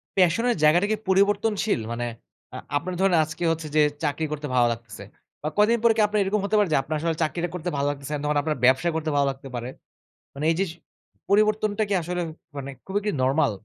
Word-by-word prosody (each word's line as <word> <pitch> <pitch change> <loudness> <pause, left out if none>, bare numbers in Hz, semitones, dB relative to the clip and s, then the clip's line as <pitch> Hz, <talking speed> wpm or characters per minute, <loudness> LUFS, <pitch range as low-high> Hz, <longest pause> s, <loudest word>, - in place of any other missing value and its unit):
প্যাশনের 195 +7 +3
জায়গাটা 175 +6 +5
কি 215 - +3
পরিবর্তনশীল? 200 - +2
মানে 120 +1 -2 0.5
আ - - -4 0.2
আপনার 180 +5 -4
ধরেন 195 -2 +4
আজকে 155 +2 -6
হচ্ছে 160 -1 -3
যে 155 - +6 0.2
চাকরি 150 +2 0
করতে 150 0 -4
ভালো 120 -1 +5
লাগতেছে। 110 -3 -7 0.4
বা 150 - -3
কয়দিন 220 +3 +4
পরে 230 -1 +6
কি - - +4
আপনার 210 0 0
এরকম 200 +2 0
হতে 215 - 0
পারে 205 -4 +2
যে - - +4
আপনার 155 +3 -4
আসলে 165 0 -1
চাকরিটা 170 +2 -2
করতে 180 0 -3
ভালো 140 0 0
লাগতেছে 145 0 -5
না - - -3
তখন 150 0 +1
আপনার 155 0 -1
ব্যবসা 130 +7 +4
করতে 160 -1 -1
ভালো 140 -1 +3
লাগতে 135 0 -11
পারে? 120 +1 -4 0.6
মানে 145 +3 -4
এই - - 0
যে 195 - +2
স - - -11 0.6
পরিবর্তনটা 215 +1 +2
কি - - +1
আসলে 175 +2 -3 0.4
মানে 140 0 -5 0.2
খুবই 195 +2 -1
কী 210 - +1
নরমাল? 135 0 +2
165 Hz, 215 wpm, -25 LUFS, 145-205 Hz, 0.6 s, যে